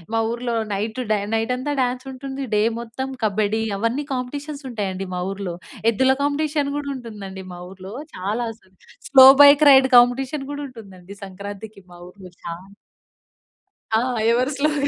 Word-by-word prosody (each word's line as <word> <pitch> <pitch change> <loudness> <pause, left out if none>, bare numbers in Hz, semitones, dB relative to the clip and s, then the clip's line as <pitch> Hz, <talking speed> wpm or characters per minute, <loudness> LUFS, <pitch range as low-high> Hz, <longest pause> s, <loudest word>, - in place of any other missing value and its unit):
మా 225 - +2
ఊర్లో 240 0 -3 0.2
night 220 +5 -3
డ్యా 215 - +2 0.2
night 225 +3 0
అంతా 290 +3 -3
డాన్స్ 250 +1 -2
ఉంటుంది. 270 +1 -6
డే 210 - +3 0.2
మొత్తం 235 +3 -5 0.2
కబడ్డీ 215 +1 0 0.2
అవన్నీ 235 +7 -1
కాంపిటీషన్స్ 285 +3 -5
ఉంటాయండి 195 -4 -4
మా 180 - -3
ఊర్లో. 195 -3 -5 0.4
ఎద్దుల 265 +4 +2
కాంపిటీషన్ 290 0 0
కూడా 290 -1 -4
ఉంటుందండి 205 -6 -8
మా 175 - -9
ఊర్లో. 190 +1 -10 0.2
చాలా 210 +6 -2 0.6
స్లో 265 -1 +9 0.2
బైక్ 285 +1 +7
రైడ్ 265 -1 +6
కాంపిటీషన్ 260 +3 +2
కూడా 290 0 -5
ఉంటుందండి 200 -5 -13
సంక్రాంతికి 200 +2 -9
మా 175 - -13
ఊర్లో 185 -1 -14 0.2
చాలా. 180 +4 -9 1.2
ఆ! 220 - +4 0.3
ఎవరు 250 +4 +1
స్లోగా 290 0 +1
235 Hz, 145 wpm, -22 LUFS, 200-270 Hz, 1.2 s, స్లో